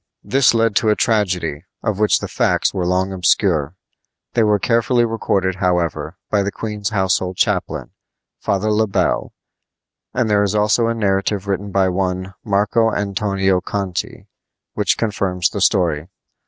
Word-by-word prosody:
This 135 Hz, -3 st, +3 dB
led 115 Hz, -2 st, +2 dB
to 110 Hz, -, +2 dB
a 105 Hz, -, +4 dB
tragedy, 90 Hz, -10 st, 0 dB, 0.2 s
of 105 Hz, -3 st, -1 dB
which 105 Hz, -1 st, +4 dB
the -, -, -4 dB
facts -, -, +1 dB
were 90 Hz, -2 st, -1 dB
long 95 Hz, +1 st, 0 dB
obscure. 90 Hz, -4 st, +1 dB, 0.6 s
They 120 Hz, -, +2 dB
were 105 Hz, -1 st, +3 dB
carefully 120 Hz, +3 st, +2 dB
recorded, 95 Hz, -5 st, -1 dB
however, 90 Hz, -3 st, -1 dB
by 105 Hz, -, +3 dB
the 100 Hz, +1 st, -1 dB
queen's 105 Hz, 0 st, -4 dB
household 95 Hz, -2 st, 0 dB
chaplain, -, -, -1 dB, 0.5 s
Father 100 Hz, +2 st, 0 dB
Le 110 Hz, +1 st, +2 dB
Bel; 100 Hz, -, 0 dB, 0.8 s
and 120 Hz, -, 0 dB
there 105 Hz, -1 st, +3 dB
is 100 Hz, 0 st, 0 dB
also 105 Hz, +2 st, +2 dB
a 115 Hz, -, 0 dB
narrative 100 Hz, -1 st, 0 dB
written 100 Hz, +1 st, -2 dB
by 95 Hz, -1 st, +2 dB
one 95 Hz, 0 st, -2 dB
Marco 105 Hz, +2 st, +2 dB
Antonio 95 Hz, -2 st, 0 dB
Conti, 95 Hz, -3 st, -4 dB, 0.5 s
which 105 Hz, -3 st, +1 dB
confirms 95 Hz, -5 st, 0 dB
the 100 Hz, -, -4 dB
story. 85 Hz, -6 st, +2 dB
100 Hz, 150 wpm, -19 LUFS, 95-105 Hz, 0.8 s, a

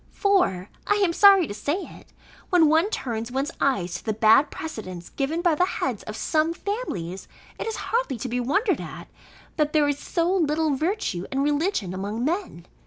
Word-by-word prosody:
For 360 Hz, -, +1 dB, 0.2 s
(I 415 Hz, -, +3 dB
am 390 Hz, -5 st, +2 dB
sorry 395 Hz, -1 st, +7 dB
to 205 Hz, -, -6 dB
say 295 Hz, -, -2 dB
it) -, -, -14 dB, 0.4 s
when 340 Hz, -5 st, +5 dB
one 325 Hz, +6 st, +3 dB
turns 230 Hz, -, -4 dB
one's 270 Hz, +4 st, -1 dB
eyes 190 Hz, -11 st, +1 dB
to 180 Hz, -, -5 dB
the 220 Hz, -, -1 dB
bad 225 Hz, +7 st, +5 dB
precedents 185 Hz, -, -7 dB
given 310 Hz, +5 st, -2 dB
by 345 Hz, -3 st, +4 dB
the 310 Hz, -, +2 dB
heads 255 Hz, -, -3 dB
of 215 Hz, -, -6 dB
some 315 Hz, +6 st, 0 dB
families, 195 Hz, -, -4 dB, 0.3 s
it -, -, -3 dB
is 450 Hz, -, -2 dB
hardly 450 Hz, -, -1 dB
to 240 Hz, -, -4 dB
be 250 Hz, +1 st, -2 dB
wondered 385 Hz, -, +1 dB
at, -, -, -9 dB, 0.5 s
that 300 Hz, -1 st, +1 dB
there 300 Hz, -2 st, +4 dB
is 285 Hz, 0 st, -1 dB
so 340 Hz, +1 st, 0 dB
little 315 Hz, -4 st, +1 dB
virtue 310 Hz, -, -2 dB
and 270 Hz, 0 st, 0 dB
religion 290 Hz, -, 0 dB
among 205 Hz, +5 st, -3 dB
men. 330 Hz, -, -3 dB
295 Hz, 185 wpm, -24 LUFS, 220-355 Hz, 0.5 s, sorry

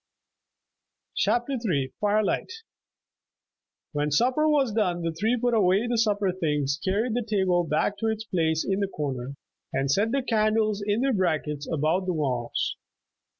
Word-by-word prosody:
CHAPTER 245 Hz, +3 st, +1 dB
III 140 Hz, -, -1 dB
FIRELIGHT 210 Hz, -, +1 dB, 1.4 s
When 150 Hz, 0 st, -1 dB
supper 255 Hz, -, +2 dB
was 280 Hz, -6 st, +2 dB
done 180 Hz, -5 st, 0 dB
the 165 Hz, -, 0 dB
three 220 Hz, +9 st, 0 dB
put 245 Hz, 0 st, +1 dB
away 200 Hz, 0 st, +3 dB
the 240 Hz, -1 st, 0 dB
supper 205 Hz, -3 st, +2 dB
things, 150 Hz, -5 st, -1 dB
carried 215 Hz, +5 st, 0 dB
the 245 Hz, -, 0 dB
table 190 Hz, -5 st, +1 dB
back 165 Hz, +6 st, 0 dB
to 225 Hz, -, -1 dB
its 220 Hz, 0 st, -1 dB
place 160 Hz, -6 st, 0 dB
in 195 Hz, 0 st, 0 dB
the 200 Hz, -, 0 dB
corner, 140 Hz, -6 st, -4 dB, 0.4 s
and 135 Hz, +1 st, 0 dB
set 205 Hz, +9 st, +2 dB
the 275 Hz, 0 st, 0 dB
candles 215 Hz, -2 st, +1 dB
in 205 Hz, +3 st, 0 dB
their 270 Hz, 0 st, +2 dB
brackets 155 Hz, -6 st, -1 dB
about 160 Hz, +5 st, 0 dB
the 180 Hz, -, +1 dB
walls. 130 Hz, -7 st, -2 dB
195 Hz, 150 wpm, -26 LUFS, 155-220 Hz, 1.4 s, away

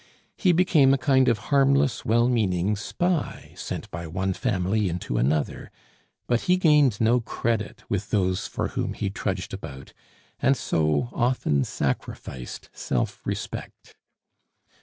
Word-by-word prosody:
He 185 Hz, -, +3 dB
became 160 Hz, -6 st, +5 dB
a -, -, -1 dB
kind 130 Hz, 0 st, +3 dB
of 115 Hz, -3 st, +3 dB, 0.2 s
harmless, 140 Hz, -1 st, +3 dB
well 120 Hz, +2 st, +3 dB
meaning 105 Hz, -5 st, +1 dB
spy, 170 Hz, -, -2 dB
sent -, -, -5 dB
by 85 Hz, 0 st, -5 dB
one 95 Hz, +4 st, -1 dB
family 100 Hz, -2 st, 0 dB
into 85 Hz, -8 st, -2 dB
another; 70 Hz, +4 st, 0 dB, 0.6 s
but 120 Hz, -1 st, +1 dB
he 180 Hz, -, +5 dB
gained 150 Hz, -, +4 dB
no 115 Hz, +2 st, +4 dB
credit 115 Hz, -1 st, -2 dB
with 100 Hz, 0 st, -2 dB
those 95 Hz, -3 st, 0 dB
for -, -, -3 dB
whom -, -, -2 dB
he 100 Hz, -2 st, -3 dB
trudged 95 Hz, -1 st, -3 dB
about, 75 Hz, -8 st, -8 dB, 0.5 s
and 135 Hz, +1 st, +3 dB
so 75 Hz, +6 st, 0 dB
often 120 Hz, -, +1 dB
sacrificed 65 Hz, -2 st, -4 dB
self 60 Hz, -, -2 dB
respect. -, -, -6 dB
110 Hz, 135 wpm, -25 LUFS, 90-130 Hz, 0.6 s, became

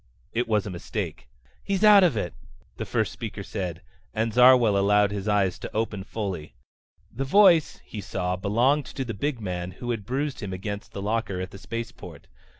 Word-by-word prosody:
It 120 Hz, +1 st, 0 dB
was 105 Hz, -3 st, +1 dB
a 100 Hz, -, -5 dB
mistake. 85 Hz, -, -5 dB, 0.3 s
"He's 200 Hz, 0 st, -1 dB
out 210 Hz, -2 st, +8 dB
of 165 Hz, -11 st, +3 dB
it," 90 Hz, -4 st, -2 dB, 0.4 s
the -, -, -4 dB
first -, -, 0 dB
speaker -, -, -6 dB
said, 85 Hz, -3 st, -5 dB, 0.3 s
and 110 Hz, 0 st, 0 dB
Zarwell 125 Hz, -3 st, +6 dB
allowed 100 Hz, +1 st, +3 dB
his 100 Hz, 0 st, -4 dB
eyes 100 Hz, -3 st, +1 dB
to -, -, -7 dB
open 110 Hz, -3 st, -1 dB
fully. 95 Hz, -7 st, -5 dB, 0.6 s
The 130 Hz, +5 st, -2 dB
voice, 170 Hz, +1 st, +5 dB
he 105 Hz, -, -7 dB
saw, 90 Hz, -1 st, -2 dB
belonged 120 Hz, +9 st, +2 dB
to 130 Hz, +3 st, -4 dB
the 115 Hz, -, -4 dB
big 135 Hz, +5 st, -2 dB
man 90 Hz, -4 st, -4 dB
who 120 Hz, +6 st, -4 dB
had 115 Hz, -4 st, -3 dB
bruised 140 Hz, +2 st, -2 dB
him 100 Hz, -4 st, -5 dB
against 100 Hz, +2 st, -6 dB
the 100 Hz, -, -5 dB
locker 105 Hz, -3 st, -1 dB
at 95 Hz, +1 st, -5 dB
the 95 Hz, -, -10 dB
spaceport. 115 Hz, +3 st, -7 dB
105 Hz, 185 wpm, -26 LUFS, 95-125 Hz, 0.6 s, out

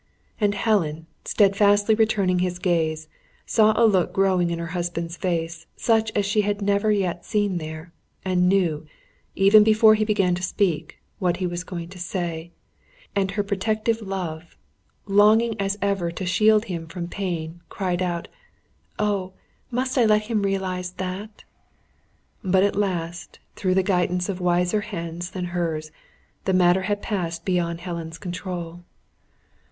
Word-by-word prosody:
And 205 Hz, -2 st, +2 dB
Helen, 165 Hz, -8 st, 0 dB, 0.2 s
steadfastly 205 Hz, +1 st, +4 dB
returning 205 Hz, -4 st, +2 dB
his 180 Hz, 0 st, -1 dB
gaze, 160 Hz, -3 st, 0 dB, 0.4 s
saw 215 Hz, -1 st, +4 dB
a 235 Hz, -, +6 dB
look 190 Hz, -5 st, +3 dB
growing 185 Hz, -3 st, +2 dB
in 170 Hz, -, -2 dB
her 170 Hz, -, -4 dB
husband's 170 Hz, -1 st, -3 dB
face, 165 Hz, -3 st, -3 dB
such 225 Hz, -2 st, +1 dB
as 205 Hz, -, +2 dB
she 210 Hz, +1 st, +2 dB
had 205 Hz, 0 st, -1 dB
never 200 Hz, +1 st, +2 dB
yet 185 Hz, -4 st, 0 dB
seen 205 Hz, -4 st, 0 dB
there, 160 Hz, +1 st, -8 dB, 0.3 s
and 180 Hz, -1 st, +2 dB
knew, 170 Hz, -6 st, +1 dB, 0.5 s
even 200 Hz, +2 st, +7 dB
before 220 Hz, 0 st, +6 dB
he 215 Hz, 0 st, +2 dB
began 200 Hz, -4 st, +2 dB
to 175 Hz, -, -3 dB
speak, 185 Hz, -3 st, -1 dB, 0.2 s
what 180 Hz, -3 st, +1 dB
he 185 Hz, -, -2 dB
was 175 Hz, 0 st, -3 dB
going 170 Hz, -2 st, -6 dB
to 185 Hz, 0 st, -11 dB
say; 170 Hz, -2 st, -4 dB, 0.7 s
and 195 Hz, -1 st, +1 dB
her 205 Hz, -, +2 dB
protective 215 Hz, +3 st, -1 dB
love, 180 Hz, -5 st, -5 dB, 0.5 s
longing 215 Hz, +3 st, +4 dB
as 195 Hz, +1 st, -1 dB
ever 195 Hz, -4 st, 0 dB
to 175 Hz, +3 st, -5 dB
shield 215 Hz, +4 st, +4 dB
him 170 Hz, -3 st, -5 dB
from 170 Hz, 0 st, -5 dB
pain, 170 Hz, -3 st, -4 dB
cried 180 Hz, -2 st, -2 dB
out: 175 Hz, -2 st, -2 dB, 0.7 s
"Oh, 200 Hz, -3 st, -1 dB, 0.4 s
must 255 Hz, +2 st, -1 dB
I 235 Hz, -, +5 dB
let 215 Hz, -1 st, +4 dB
him 215 Hz, -1 st, -1 dB
realise 190 Hz, -2 st, -1 dB
that?" 190 Hz, +3 st, -6 dB, 1.0 s
But, 190 Hz, 0 st, +3 dB
at 200 Hz, -, +1 dB
last, 175 Hz, -4 st, -3 dB, 0.2 s
through 185 Hz, -2 st, 0 dB
the 190 Hz, -, +3 dB
guidance 180 Hz, -1 st, 0 dB
of 185 Hz, -2 st, -3 dB
wiser 180 Hz, +3 st, +2 dB
Hands 175 Hz, -4 st, -5 dB
than 185 Hz, -1 st, -4 dB
hers, 160 Hz, -3 st, -2 dB, 0.5 s
the 190 Hz, -, +1 dB
matter 180 Hz, 0 st, +4 dB
had 205 Hz, +2 st, -2 dB
passed 170 Hz, -6 st, -3 dB
beyond 170 Hz, -2 st, -1 dB
Helen's 170 Hz, -2 st, -5 dB
control. 175 Hz, -1 st, -6 dB
185 Hz, 150 wpm, -24 LUFS, 175-205 Hz, 1.0 s, even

